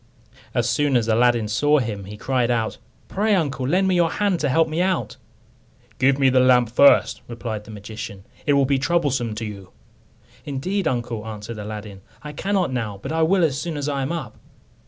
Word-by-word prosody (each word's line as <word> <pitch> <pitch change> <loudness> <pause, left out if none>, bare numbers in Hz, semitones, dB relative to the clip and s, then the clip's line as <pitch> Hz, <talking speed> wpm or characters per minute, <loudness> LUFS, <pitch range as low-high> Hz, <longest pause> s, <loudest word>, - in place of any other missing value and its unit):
As 120 -2 +1
soon 135 +2 +2
as 115 -2 -1
Aladdin 115 0 +3
saw 145 +8 +2
him, 110 -7 -3
he 105 +2 -9
cried 125 0 0
out, 115 -2 -1 0.3
"Pray, 210 +1 +1
uncle, 140 -7 -1
lend 185 +6 +2
me 190 - +2
your 170 -2 +3
hand, 200 -2 0
to 145 - 0
help 160 +4 +3
me 160 +2 -1
out." 185 -1 -1 0.8
"Give 135 +1 +3
me 135 -1 +4
the 130 - +4
lamp 125 -2 +4
first," 140 +4 +5
replied 115 -3 -5
the - - -14
magician; 105 -2 -8 0.2
"it 145 - +4
will 140 -1 +4
be 135 0 +1
troublesome 135 -6 0
to 115 +1 -4
you," 100 -3 -8 0.7
"Indeed, 165 +7 -2
uncle," 120 -3 -2
answered 110 +1 -7
Aladdin, 105 -2 -7 0.2
"I 150 - -6
cannot 190 -2 -1
now, 110 -5 -3
but 135 - -6
I 160 0 0
will 180 +3 +3
as 145 -3 +1
soon 165 -2 -4
as 145 0 -3
I 140 -2 -1
am 135 - -2
up." 170 -2 -5
130 Hz, 200 wpm, -22 LUFS, 110-155 Hz, 0.8 s, first